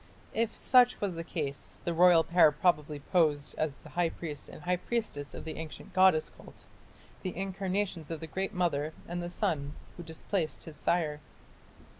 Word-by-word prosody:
If 225 Hz, 0 st, 0 dB
such 250 Hz, -1 st, +5 dB
was 200 Hz, -3 st, -1 dB
the 165 Hz, -, -4 dB
case, 145 Hz, -4 st, -4 dB
the 170 Hz, -, 0 dB
royal 170 Hz, -1 st, +6 dB
pair 170 Hz, -3 st, +6 dB
probably 150 Hz, -2 st, +1 dB
posed 150 Hz, -3 st, +2 dB
as 155 Hz, -3 st, -1 dB
the -, -, -14 dB
high 175 Hz, -1 st, +1 dB
priest 150 Hz, -4 st, -7 dB
and -, -, -11 dB
high 180 Hz, +2 st, +1 dB
priestess 175 Hz, -10 st, -3 dB
of -, -, -7 dB
the 160 Hz, -, -5 dB
ancient 160 Hz, +3 st, -8 dB
goddess 185 Hz, -4 st, +4 dB
cult -, -, -14 dB, 0.6 s
the 185 Hz, -2 st, -4 dB
incarnations 190 Hz, -3 st, -2 dB
of 165 Hz, -2 st, -4 dB
the 160 Hz, -, -6 dB
Great 190 Hz, +4 st, -3 dB
Mother 160 Hz, -5 st, 0 dB
and 175 Hz, +1 st, -3 dB
the 175 Hz, -, -4 dB
son 150 Hz, -4 st, -1 dB, 0.2 s
who -, -, -6 dB
displaced 160 Hz, +1 st, -3 dB
his 160 Hz, -, -9 dB
sire. 155 Hz, -2 st, 0 dB
170 Hz, 175 wpm, -31 LUFS, 155-185 Hz, 0.6 s, royal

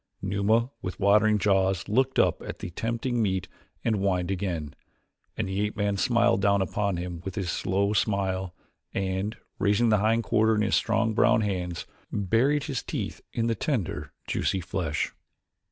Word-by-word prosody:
Numa, 105 Hz, +5 st, +1 dB
with 95 Hz, -1 st, -5 dB
watering 105 Hz, +2 st, +4 dB
jaws, 95 Hz, -2 st, +2 dB
looked 130 Hz, +5 st, +1 dB
up -, -, +3 dB
at -, -, -6 dB
the 90 Hz, -, -6 dB
tempting 115 Hz, +5 st, -1 dB
meat 95 Hz, -4 st, 0 dB, 0.4 s
and 110 Hz, -2 st, +2 dB
whined 95 Hz, -2 st, 0 dB
again 85 Hz, -6 st, -3 dB, 0.6 s
and 110 Hz, -, -1 dB
the 95 Hz, +1 st, -1 dB
ape 105 Hz, +2 st, -2 dB
man 100 Hz, -1 st, +1 dB
smiled 115 Hz, -1 st, +3 dB
down 100 Hz, 0 st, +3 dB
upon 100 Hz, 0 st, 0 dB
him 85 Hz, -1 st, -5 dB
his 95 Hz, -4 st, -2 dB
slow 100 Hz, +4 st, 0 dB
smile 95 Hz, -3 st, 0 dB, 0.4 s
and, 95 Hz, +3 st, -1 dB, 0.2 s
raising 105 Hz, +4 st, +3 dB
the 105 Hz, -1 st, +4 dB
hind 115 Hz, +2 st, +2 dB
quarter 110 Hz, +2 st, +3 dB
in 105 Hz, -, +1 dB
his 105 Hz, -, 0 dB
strong 110 Hz, 0 st, +2 dB
brown 110 Hz, -, +4 dB
hands 90 Hz, -4 st, -2 dB, 0.3 s
buried 115 Hz, +9 st, +2 dB
his -, -, -3 dB
teeth -, -, -4 dB
in 115 Hz, -, -1 dB
the 115 Hz, -, +2 dB
tender, 110 Hz, -, -2 dB
juicy 95 Hz, -, 0 dB
flesh. 85 Hz, -4 st, -2 dB
100 Hz, 160 wpm, -27 LUFS, 95-110 Hz, 0.6 s, watering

